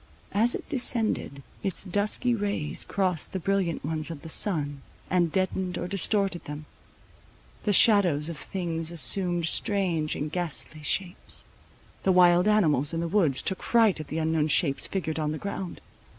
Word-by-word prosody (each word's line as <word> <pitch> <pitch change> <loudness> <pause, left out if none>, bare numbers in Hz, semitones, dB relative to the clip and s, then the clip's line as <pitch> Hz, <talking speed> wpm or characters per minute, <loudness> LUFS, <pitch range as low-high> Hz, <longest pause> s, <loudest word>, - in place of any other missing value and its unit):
As 230 +4 +2
it - - -7
descended, 225 - -1 0.2
its 195 -3 -3
dusky 205 +6 0
rays 200 -8 -2
crossed 185 -6 -1
the 190 - -2
brilliant 185 -5 -1
ones 155 0 -2
of 160 -4 -8
the 160 - -8
sun, 145 -7 -1 0.3
and 175 -3 +2
deadened 185 -1 -1
or 175 - -3
distorted 195 -1 0
them. 150 +1 -7 1.0
The 210 - +2
shadows 180 -9 +5
of 170 - -4
things 165 -3 -3
assumed 175 +2 +3
strange 170 -4 0
and 150 +1 -4
ghastly 160 -3 -3
shapes. 175 +4 -2 0.6
The 190 - +2
wild 180 +1 +5
animals 160 -8 +3
in - - -1
the 170 - -2
woods 165 -8 +2
took 190 - -2
fright 225 -7 +3
at 155 - -7
the 155 - -5
unknown 160 -1 +1
shapes 140 -1 +2
figured 160 -4 -3
on 150 0 -1
the - - -4
ground. 190 0 -6
175 Hz, 160 wpm, -27 LUFS, 155-195 Hz, 1.0 s, shadows